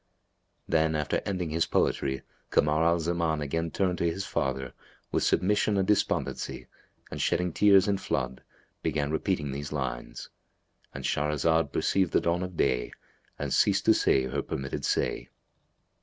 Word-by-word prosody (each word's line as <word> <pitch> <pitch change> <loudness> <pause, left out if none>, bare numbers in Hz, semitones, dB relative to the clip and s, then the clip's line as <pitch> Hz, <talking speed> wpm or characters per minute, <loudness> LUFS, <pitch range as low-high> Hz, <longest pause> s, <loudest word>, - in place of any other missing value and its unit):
'" - - -48 0.2
Then, 80 -1 +2
after 75 -1 0
ending 90 -5 -2
his 85 +1 +1
poetry, 65 -1 0 0.3
Kamar 75 +2 +2
al 85 +1 +3
Zaman 85 -1 0
again 80 +3 -2
turned 90 0 -1
to 85 - +2
his 95 +3 -4
father, 65 -2 -2 0.4
with - - +1
submission 105 +2 +2
and 95 -1 +1
despondency, 105 - -1 0.5
and - - -4
shedding 90 -2 0
tears 100 -1 +5
in 100 -1 +1
flood, 65 0 -2 0.4
began 70 0 -1
repeating 80 -3 -1
these 70 +2 -5
lines.—And 60 -4 -8
Shahrazad 75 +3 +1
perceived 95 -3 +1
the - - +5
dawn 85 +1 0
of 90 -2 -5
day - - +1 0.4
and - - -3
ceased - - +3
to - - +7
say 65 - +3
her 65 +2 -2
permitted 65 0 -4
say. - - -1
80 Hz, 150 wpm, -28 LUFS, 70-90 Hz, 0.5 s, to